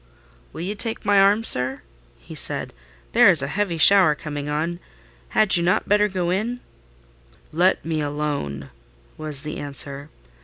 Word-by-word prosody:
"Will -, -, -8 dB
you 190 Hz, +4 st, -3 dB
take 225 Hz, +1 st, -4 dB
my 205 Hz, -1 st, +4 dB
arm, 200 Hz, +3 st, +4 dB
sir?" 130 Hz, -, +1 dB, 0.3 s
he -, -, -13 dB
said; -, -, -4 dB, 0.4 s
"there -, -, +6 dB
is 150 Hz, -5 st, +4 dB
a -, -, -2 dB
heavy 195 Hz, +1 st, -2 dB
shower 180 Hz, -2 st, +6 dB
coming 145 Hz, -1 st, -6 dB
on: 165 Hz, +4 st, -2 dB, 0.5 s
had 215 Hz, -3 st, +3 dB
you 175 Hz, -, +1 dB
not 175 Hz, +2 st, +1 dB
better 210 Hz, +1 st, +3 dB
go 180 Hz, -3 st, -2 dB
in?" 225 Hz, +6 st, -2 dB, 0.9 s
"Let 180 Hz, +4 st, +2 dB
me 160 Hz, -1 st, -1 dB
alone," 145 Hz, -, -4 dB, 0.4 s
was 150 Hz, -3 st, -4 dB
the 150 Hz, 0 st, -5 dB
answer. 140 Hz, 0 st, -6 dB
165 Hz, 155 wpm, -22 LUFS, 145-195 Hz, 0.9 s, there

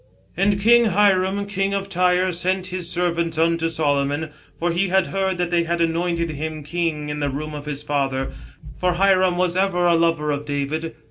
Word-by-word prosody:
" -, -, -35 dB
And 200 Hz, 0 st, +1 dB
Hiram 205 Hz, -4 st, +3 dB
king 200 Hz, 0 st, -1 dB
of 195 Hz, 0 st, -3 dB
Tyre 180 Hz, 0 st, +2 dB
sent 185 Hz, +2 st, -1 dB
his 180 Hz, -2 st, -3 dB
servants 170 Hz, -2 st, -1 dB
unto 165 Hz, 0 st, +1 dB
Solomon; 145 Hz, -1 st, -1 dB, 0.3 s
for 175 Hz, +1 st, 0 dB
he 180 Hz, +4 st, +1 dB
had 190 Hz, 0 st, +2 dB
heard 190 Hz, -1 st, -1 dB
that 175 Hz, -1 st, -2 dB
they 170 Hz, -1 st, +3 dB
had 170 Hz, +1 st, -1 dB
anointed 170 Hz, 0 st, 0 dB
him 155 Hz, +1 st, -5 dB
king 155 Hz, -1 st, -2 dB
in 150 Hz, 0 st, -4 dB
the 145 Hz, -1 st, 0 dB
room 150 Hz, +3 st, -5 dB
of 145 Hz, -1 st, -7 dB
his 145 Hz, -1 st, -4 dB
father: 135 Hz, -2 st, -1 dB, 0.5 s
for 180 Hz, -1 st, +1 dB
Hiram 185 Hz, -1 st, +3 dB
was 180 Hz, -1 st, +1 dB
ever 185 Hz, -2 st, +1 dB
a 175 Hz, -, +4 dB
lover 165 Hz, -2 st, +1 dB
of 145 Hz, 0 st, -2 dB
David. 150 Hz, +3 st, -3 dB
170 Hz, 190 wpm, -22 LUFS, 155-185 Hz, 0.5 s, a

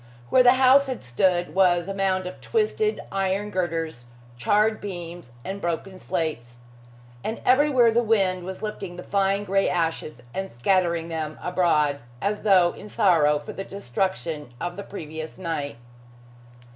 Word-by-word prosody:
Where 255 Hz, -, +6 dB
the 245 Hz, 0 st, +7 dB
house 265 Hz, +2 st, +5 dB
had 260 Hz, -2 st, -4 dB
stood 175 Hz, +9 st, +1 dB
was 175 Hz, -2 st, +3 dB
a 195 Hz, -, -3 dB
mound 190 Hz, -1 st, 0 dB
of 180 Hz, -, -8 dB
twisted 435 Hz, -1 st, 0 dB
iron 195 Hz, +2 st, -1 dB
girders, 165 Hz, -8 st, -2 dB, 0.3 s
charred 210 Hz, -, +2 dB
beams 175 Hz, -7 st, -7 dB
and 195 Hz, +1 st, -5 dB
broken 175 Hz, +3 st, -3 dB
slates. 150 Hz, -11 st, -3 dB, 0.7 s
And 220 Hz, -, -3 dB
everywhere 260 Hz, -3 st, +5 dB
the 235 Hz, +2 st, +3 dB
wind 195 Hz, -5 st, +1 dB
was 190 Hz, +3 st, -7 dB
lifting 195 Hz, -4 st, -5 dB
the 180 Hz, -, -8 dB
fine 195 Hz, 0 st, +1 dB
gray 195 Hz, 0 st, +1 dB
ashes 165 Hz, -6 st, -2 dB
and 190 Hz, 0 st, -4 dB
scattering 170 Hz, +5 st, +1 dB
them 155 Hz, -2 st, -4 dB
abroad, 155 Hz, -6 st, +1 dB, 0.2 s
as 205 Hz, +7 st, -1 dB
though 185 Hz, -4 st, +5 dB
in 210 Hz, -, -11 dB
sorrow 165 Hz, -10 st, +3 dB
for 145 Hz, -, -8 dB
the 195 Hz, -, -5 dB
destruction 170 Hz, -5 st, -3 dB
of 175 Hz, +3 st, -4 dB
the 200 Hz, -, -6 dB
previous 160 Hz, -5 st, -7 dB
night. 155 Hz, -8 st, -4 dB
185 Hz, 150 wpm, -25 LUFS, 165-200 Hz, 0.7 s, the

